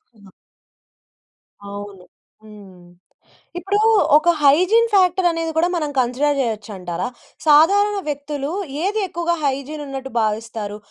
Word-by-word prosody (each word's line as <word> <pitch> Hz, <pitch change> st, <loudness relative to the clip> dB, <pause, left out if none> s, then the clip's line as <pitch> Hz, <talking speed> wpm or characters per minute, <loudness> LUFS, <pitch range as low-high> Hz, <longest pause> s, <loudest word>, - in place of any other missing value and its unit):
హ్మ్. 200 Hz, -2 st, -18 dB
ఆ! -, -, -19 dB, 1.4 s
అవును. 200 Hz, -2 st, -9 dB, 0.4 s
హ్మ్. 195 Hz, -5 st, -15 dB, 0.7 s
ఇప్పుడూ 390 Hz, +4 st, -1 dB, 0.4 s
ఒక 310 Hz, +3 st, +4 dB
హైజీన్ 365 Hz, +11 st, +4 dB
ఫ్యాక్టరనేది 350 Hz, -3 st, +2 dB
కూడా 335 Hz, +2 st, +3 dB
మనం 305 Hz, -4 st, -2 dB
కన్సిడర్ 275 Hz, +4 st, 0 dB
జేయొచ్చంటారా? 205 Hz, -7 st, -4 dB, 0.4 s
సాధారణ 395 Hz, +8 st, +4 dB
వ్యక్తులు 290 Hz, 0 st, -4 dB, 0.3 s
ఏది 420 Hz, +3 st, 0 dB
ఎక్కువగా 345 Hz, 0 st, -2 dB
హైజీనున్నట్టు 275 Hz, -1 st, -4 dB
భావిస్తారు? 215 Hz, -1 st, -3 dB
285 Hz, 100 wpm, -20 LUFS, 215-345 Hz, 1.4 s, ఒక